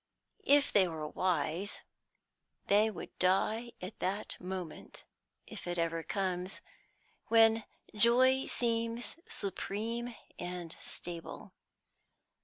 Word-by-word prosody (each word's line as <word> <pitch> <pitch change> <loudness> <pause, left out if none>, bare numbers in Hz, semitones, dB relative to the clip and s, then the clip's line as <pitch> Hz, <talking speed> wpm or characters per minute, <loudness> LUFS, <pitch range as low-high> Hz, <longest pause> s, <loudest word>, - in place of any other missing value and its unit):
If 285 0 +5
they 190 -3 +5
were 160 -2 -4
wise, 180 +2 -1 0.8
they 210 +2 +5
would 215 - -8
die 220 +6 +2
at 185 +4 -7
that 195 +3 -1
moment 180 -3 -6 0.4
if - - -8
it 175 0 -2
ever 165 0 0
comes 185 0 -2 0.7
when 225 0 +6 0.3
joy 255 +4 +5
seems 230 +1 0
supreme 225 +4 -3 0.2
and 175 -2 -5
stable. 170 -1 -7
200 Hz, 95 wpm, -33 LUFS, 180-230 Hz, 0.8 s, when